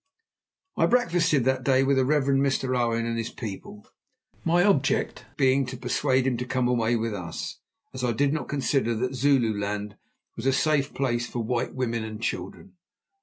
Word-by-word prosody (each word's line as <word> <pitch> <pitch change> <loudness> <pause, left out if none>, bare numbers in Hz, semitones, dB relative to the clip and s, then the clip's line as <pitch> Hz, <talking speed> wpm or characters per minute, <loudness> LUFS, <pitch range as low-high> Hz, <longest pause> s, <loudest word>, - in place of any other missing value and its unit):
I - - +4
breakfasted 170 - +2
that 130 -1 +1
day 135 0 +3
with 135 0 +2
the 130 - +3
Reverend 140 -1 +2
Mr. 135 -2 0
Owen 115 -1 0
and 115 0 -2
his 115 - -3
people, 205 - -8 0.6
my 175 +1 +3
object 145 -10 +1
being 135 0 +3
to 130 +1 -6
persuade 130 +1 +1
him 130 -3 +1
to 125 - -3
come 130 -1 0
away 120 -1 +1
with 115 -1 -1
us, 90 -4 -6 0.3
as 130 -1 -5
I 125 - +2
did 140 +5 +1
not 155 - -3
consider 135 -4 0
that 125 +4 -2
Zululand 105 -6 0 0.4
was 115 - -3
a 135 - +4
safe 145 0 +1
place 120 -3 0
for 120 -1 -4
white 125 +3 -2
women 115 -3 -1
and 110 -1 -6
children. 120 - -5
130 Hz, 175 wpm, -26 LUFS, 115-140 Hz, 0.6 s, I